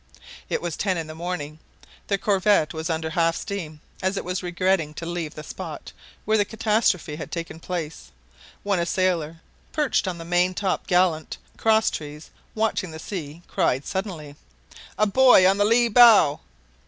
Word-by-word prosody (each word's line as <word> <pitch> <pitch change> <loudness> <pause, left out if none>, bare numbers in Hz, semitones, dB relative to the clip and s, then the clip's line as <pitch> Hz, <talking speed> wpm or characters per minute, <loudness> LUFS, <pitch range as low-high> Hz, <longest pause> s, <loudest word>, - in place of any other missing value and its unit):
It - - -2
was 170 -4 -3
ten 190 -3 -1
in 165 - -3
the 155 - -9
morning; 160 -2 -5 0.5
the 200 - +1
corvette 195 -4 +2
was 160 +1 -4
under 160 -1 -2
half 165 0 +1
steam, 160 -7 -6 0.2
as 190 +1 -1
it - - -4
was 180 +1 -3
regretting 175 -3 0
to 165 - -6
leave 170 -3 -4
the 155 - -8
spot 160 -1 -8 0.3
where 215 +1 +2
the - - +4
catastrophe 215 -7 0
had 155 - -7
taken 165 -1 -5
place, 165 -3 -5 0.5
when 200 -3 0
a 170 - 0
sailor, 165 -4 -1 0.3
perched 295 -9 +1
on 180 -2 -3
the 165 - -8
main 180 +2 +1
top 190 -1 -2
gallant 175 -3 +1 0.2
crosstrees, 160 -9 0 0.2
watching 220 -4 -1
the 160 - -8
sea, 160 -2 -7
cried 135 +3 0
suddenly: 175 -7 -5 0.6
"A 215 - +3
buoy 245 -2 +6
on 195 +2 +3
the 205 - +4
lee 235 +2 +4
bow!" 225 -10 +6
180 Hz, 165 wpm, -24 LUFS, 160-200 Hz, 0.6 s, buoy